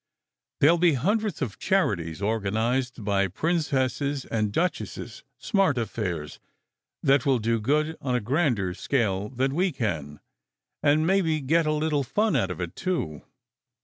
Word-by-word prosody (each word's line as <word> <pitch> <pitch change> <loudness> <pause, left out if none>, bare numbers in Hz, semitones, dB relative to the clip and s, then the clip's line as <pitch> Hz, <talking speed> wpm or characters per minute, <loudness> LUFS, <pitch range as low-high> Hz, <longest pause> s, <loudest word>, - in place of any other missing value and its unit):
There 145 - +7
ll 170 - 0
be 175 -2 +4
hundreds 205 - 0
of 105 -6 -5
charities 95 - 0
organized 115 +3 -1
by 100 -1 +2
princesses 140 - -1
and 110 -2 -1
duchesses, 175 - -3
smart 195 - +1
affairs 95 -9 -3 0.6
that 135 -2 +4
will 135 -2 +3
do 115 0 0
good 150 +7 +1
on 130 -2 -1
a - - +2
grander 120 - 0
scale 105 -3 -1
than 130 +1 -1
we 180 +4 +1
can, 80 - -3 0.6
and 150 +2 +3
maybe 170 -4 +2
get 155 +4 +2
a - - +2
little 150 -1 +1
fun 215 - +1
out 95 - +1
of 90 - -5
it, 90 0 -4
too. 90 - -2
130 Hz, 145 wpm, -26 LUFS, 105-155 Hz, 0.6 s, There